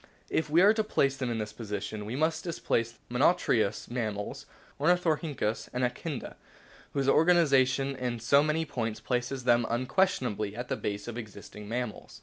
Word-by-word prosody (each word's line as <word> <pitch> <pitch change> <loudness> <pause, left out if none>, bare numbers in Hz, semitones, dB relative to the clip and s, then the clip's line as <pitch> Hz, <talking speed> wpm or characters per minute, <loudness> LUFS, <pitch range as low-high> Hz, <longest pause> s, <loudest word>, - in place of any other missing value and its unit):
If 160 - 0
we 165 +4 +5
are 205 +2 +7
to 220 -1 +1
place 140 -10 +1
them 130 -2 -3
in 115 - -1
this 105 -1 -4
position 105 -1 -5
we 115 - -4
must 160 +2 0
displace 115 -9 -1
the 120 +1 -7
monotrematous 110 - +2
mammals 110 -4 -3 0.3
(Ornithorhynchus 155 -7 +1
and 125 +1 -1
Echidna), 130 +3 -3 0.6
whose 135 -1 0
organisation 140 -5 +4
in 125 -2 -3
so 140 +5 +4
many 155 +2 0
points 115 -7 -3
places 125 +3 -2
them 120 -1 +4
un 120 +2 0
questionably 125 - 0
at 120 +1 -5
the - - 0
base 100 +1 -4
of 120 - -4
the 120 - -4
existing 105 -1 -11
mammals. 120 -2 -5
125 Hz, 170 wpm, -29 LUFS, 110-150 Hz, 0.6 s, are